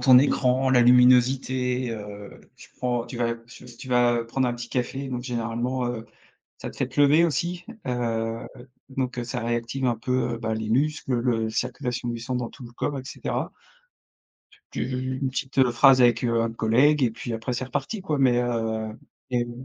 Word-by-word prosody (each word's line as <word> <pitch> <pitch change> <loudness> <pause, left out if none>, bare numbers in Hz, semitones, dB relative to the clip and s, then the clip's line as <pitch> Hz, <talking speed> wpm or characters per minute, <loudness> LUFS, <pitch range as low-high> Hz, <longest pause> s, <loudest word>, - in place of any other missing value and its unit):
ton 130 -2 +8
écran, 130 -1 +2
la 125 -2 +5
luminosité, 125 0 +4
heu, 105 -2 -8 0.2
tu - - -15
prends, 120 -2 -1
tu 125 - -8
vas 115 -1 +1
tu 115 +2 -15
v 120 -1 -13
tu 130 - -10
vas 120 -1 +3
prendre 125 +2 0
un 120 - -2
petit 120 0 -8
café, 135 +2 -2
donc 125 -2 -4
généralement, 120 +1 -2
heu, 120 -2 -4 0.5
ça - - -6
te - - -14
fait - - 0
te - - -4
lever 145 +3 +6
aussi. 175 +2 -2 0.2
Heu, 115 -2 -2 0.4
donc 130 -2 -3
ça 125 +1 -4
réactive 120 +3 -2
un 120 -2 +2
peu, 125 +1 -1
bah, 110 -1 -2
les 110 0 -3
muscles, 140 +2 0
le 120 -2 0
circulation 125 +1 -3
du 120 -1 -4
sang 125 +2 -3
dans 125 -2 -2
tout 130 - -13
le 120 - -12
corps 140 +3 -2
et - - -8
cetera. - - -4 1.2
Tu - - -2
v 130 - -4 0.3
une 135 - 0
petite 130 -1 +1
phrase 130 +2 +6
avec, 120 -1 +4
heu, 115 -1 +2
un 115 0 -1
collègue 130 +7 +3
et 125 - +3
puis 115 +2 -6
après 115 +2 -3
c'est 130 - -2
reparti 190 - -4
quoi, 155 -6 -1
mais 125 -3 +4
heu, 110 -2 -2 0.3
game 120 0 -2
125 Hz, 190 wpm, -25 LUFS, 115-130 Hz, 1.2 s, ton